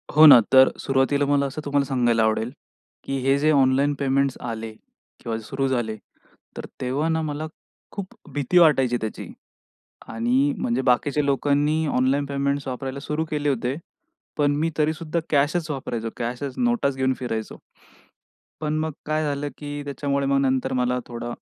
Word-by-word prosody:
हो 155 +1 +9
ना. 145 -5 +11
तर 130 0 +8
सुरुवातीला 135 +1 +1
मला 140 0 +2
असं 140 +3 -5
तुम्हाला 145 -1 +1
सांगायला 120 -4 +2
आवडेल, 110 +2 0 0.5
की 135 - -3
हे 135 +2 +3
जे 155 +2 +3
ऑनलाईन 140 0 +3
पेमेंट्स 140 -1 +1
आले 115 -2 -5 0.5
किंवा 115 -1 -2
सुरु 135 +5 -2
झाले, 120 -4 -1 0.6
तर - - -5 0.2
तेव्हा 135 +6 -1
ना 160 0 +1
मला 155 0 -3 0.4
खूप 195 -2 -7 0.2
भीती 145 +5 0
वाटायची 135 -8 +5
त्याची. 110 -1 -5 0.8
आणि 125 +5 +1
म्हणजे 120 +2 -1
बाकीच्या 135 +4 +1
लोकांनी 145 +3 +1
ऑनलाईन 135 +1 +1
पेमेंट्स 140 0 -2
वापरायला 130 +1 -4
सुरू 150 +3 -2
केले 150 -1 0
होते. 125 0 -1 0.6
पण 145 -1 +2
मी 160 +3 0
तरीसुद्धा 155 +2 0
कॅशच 155 +3 +1
वापरायचो. 120 -5 -4
कॅशच 125 +3 -4
नोटाच 240 - +1
घेऊन 130 0 +1
फिरायचो. 115 -3 -4 1.0
पण 155 0 -1
मग 160 0 -2
काय 155 +1 0
झालं 145 -1 -2
की 145 0 -6
त्याच्यामुळे 140 0 -2
मग 140 0 +2
नंतर 130 -1 0
मला 125 0 +1
थोडा 120 0 -6
140 Hz, 155 wpm, -23 LUFS, 130-145 Hz, 1.0 s, ना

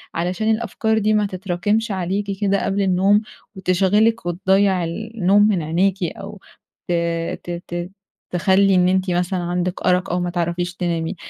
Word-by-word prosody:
علشان 185 +6 0
الأفكار 220 0 0
دي 215 0 +2
ما 210 -1 +2
تتراكمش 200 +4 -1
عليكِ 190 +2 -2 0.2
كده 200 -1 +1
قبل 200 +1 0
النوم 195 +2 +3 0.3
وتشغلِك 195 +4 +2
وتضّيع 190 +1 +2
النوم 205 +2 +1
من 195 -5 +1
عينيكِ 185 +5 0
أو 195 +4 -6 0.5
ت 175 - 0 0.5
ت 175 0 -6
ت 175 +1 -5 0.4
تخلّي 190 +2 +3
إن 180 0 +4
أنتِ 185 0 +1
مثلًا 180 +1 0
عندِك 175 +1 -2
أرق 180 +1 +2
أو 175 - 0
ما 175 0 -2
تعرفيش 175 +1 -2
تنامي 170 -1 -2
190 Hz, 150 wpm, -20 LUFS, 175-205 Hz, 0.5 s, إن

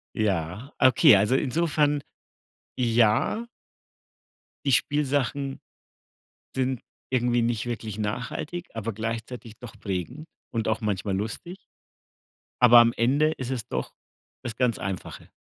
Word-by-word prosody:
Ja, 100 - -2
okay, 130 -5 +7
also 105 +6 +2
insofern 150 +1 +1 0.7
ja 120 - +2 1.2
die 140 - +2
Spielsachen 140 0 0 0.9
sind 130 -2 -1 0.3
irgendwie 120 -1 +2
nicht 115 -1 -1
wirklich 110 -3 -4
nachhaltig, 125 +10 -4
aber 115 0 -3
gleichzeitig 115 +1 -5
doch 120 - -10
prägend 105 - -4 0.3
und 115 -2 -1
auch 110 - 0
manchmal 100 -2 -1
lustig 115 - -5 1.1
aber 120 0 +9
am 115 0 +6
Ende 145 +6 +3
ist 130 -4 -5
es 125 -5 -3
doch - - -4 0.5
das 115 -2 -5
ganz 125 -3 +1
Einfache. 95 -2 -6
120 Hz, 115 wpm, -26 LUFS, 110-135 Hz, 1.2 s, aber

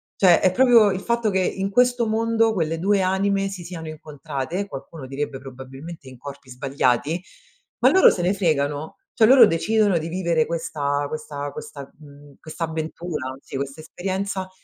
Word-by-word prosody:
cioè 180 -3 +5
è 185 - +3
proprio 235 -1 +5
il 185 - -2
fatto 235 +1 0
che 190 - 0
in 195 +1 -1
questo 245 +2 +2
mondo 225 +1 +2
quelle 165 -4 -1
2 195 +2 +2
anime 195 +1 +1
si 185 -3 -7
siano 165 -2 -8
incontrate, 155 +3 -5
qualcuno 140 -2 -9
direbbe 135 +1 -4
probabilmente 135 +4 -10
in 130 - -13
corpi 140 0 -10
sbagliati, 135 +5 0 0.6
ma - - +7
loro 380 - +7
se 175 - -2
ne 185 - +2
fregano, 155 -5 -1 0.2
cioè 220 - +4
loro 265 +2 +9
decidono 200 +2 +2
di 160 - -5
vivere 170 -2 0
questa 145 -4 -2
questa 145 -1 -6
questa 145 -2 -9
mhmm, 145 -1 -16
questa 160 +1 -6
avventura, 160 -4 -4
sì, - - -6
questa 140 +3 -5
esperienza 190 +3 -4
165 Hz, 165 wpm, -23 LUFS, 145-195 Hz, 0.6 s, loro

